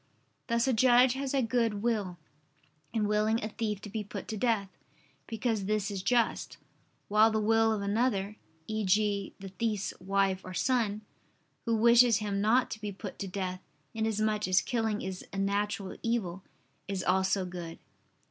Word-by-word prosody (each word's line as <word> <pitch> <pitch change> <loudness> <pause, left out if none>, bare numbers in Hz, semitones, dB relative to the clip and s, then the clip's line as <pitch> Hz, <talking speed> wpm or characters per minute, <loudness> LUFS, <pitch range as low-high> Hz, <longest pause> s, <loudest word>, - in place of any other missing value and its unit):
Thus 235 +1 +1
a 260 - +3
judge 245 +2 +5
has 270 0 -3
a 275 -2 +1
good 225 -3 0
will, 210 -7 -1 0.7
in 220 -2 0
willing 215 +2 +1
a 215 - -2
thief 210 -2 -3
to 210 - -8
be 215 0 -3
put 205 - -7
to 220 - -3
death, 215 -2 +1 0.6
because 225 -2 -1
this 210 0 0
is 195 -2 -3
just: 235 +4 0 0.5
while 215 +2 +5
the 220 -1 0
will 225 +1 +3
of 210 -2 -1
another 205 -1 0 0.3
e.g. 205 -1 0
the 195 0 -8
thief's 205 +1 -2
wife 195 0 +1
or 185 0 -8
son, 220 -2 +1 0.6
who 230 -1 +1
wishes 235 0 +6
him 205 -2 -2
not 235 +4 +3
to 215 - -6
be 210 -1 -3
put 200 0 -8
to 195 - -3
death, 185 -1 -4 0.3
inasmuch 215 -2 0
as 185 0 +4
killing 225 -3 -1
is 190 -1 -5
a - - -6
natural 200 0 -1
evil, 195 -6 -1 0.5
is 190 -1 -3
also 190 +1 +1
good. 175 -2 -7
210 Hz, 165 wpm, -30 LUFS, 195-225 Hz, 0.7 s, wishes